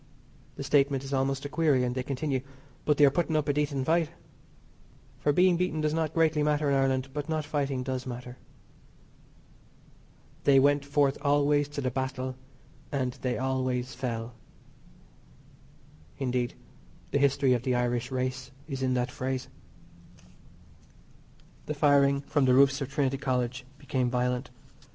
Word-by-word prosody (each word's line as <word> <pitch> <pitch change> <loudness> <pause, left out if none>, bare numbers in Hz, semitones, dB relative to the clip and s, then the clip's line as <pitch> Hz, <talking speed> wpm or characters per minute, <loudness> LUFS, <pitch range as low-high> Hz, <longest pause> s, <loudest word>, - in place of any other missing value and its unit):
The - - -5
statement 140 -1 +2
is 135 +1 -6
almost 135 +1 0
a - - -3
query, 145 -5 +2
and 125 0 -1
they 130 - -2
continue, 135 0 -2 0.4
"but 150 -1 +2
they 145 - +7
are 140 - +5
putting 160 +1 0
up 155 -1 +1
a 145 - +2
decent 140 -2 -1
fight." 165 0 +2 1.1
For 145 - +2
being 180 +3 +4
beaten 180 -3 -1
does 155 0 0
not 160 -1 -1
greatly 160 -2 +3
matter 150 0 +1
in - - +3
Ireland, 135 -1 +1
but 145 +1 -4
not 155 -2 -1
fighting 140 -3 -1
does 130 0 -4
matter. 125 0 -7 2.0
"They 140 -1 +6
went 145 +1 +3
forth 140 -1 +1
always 145 0 +2
to 145 -1 -5
the 130 -1 -1
battle; 130 0 -3 0.6
and 130 -3 -1
they 125 -1 -1
always 130 -1 -1
fell," 120 -2 -4 1.8
Indeed, 125 -2 -1 0.6
the 140 - +2
history 140 -1 +3
of 120 - 0
the 125 0 0
Irish 125 0 0
race 130 0 -3 0.2
is 135 -4 -5
in 130 -1 +1
that 125 0 -1
phrase. 130 0 -3 2.2
The 150 - -2
firing 140 -1 +4
from 145 -1 +1
the 125 -1 +4
roofs 140 +1 +4
of 135 - -3
Trinity 135 -1 0
College 125 -2 -1
became 135 -3 -1
violent. 125 +1 -1
135 Hz, 150 wpm, -28 LUFS, 130-145 Hz, 2.2 s, they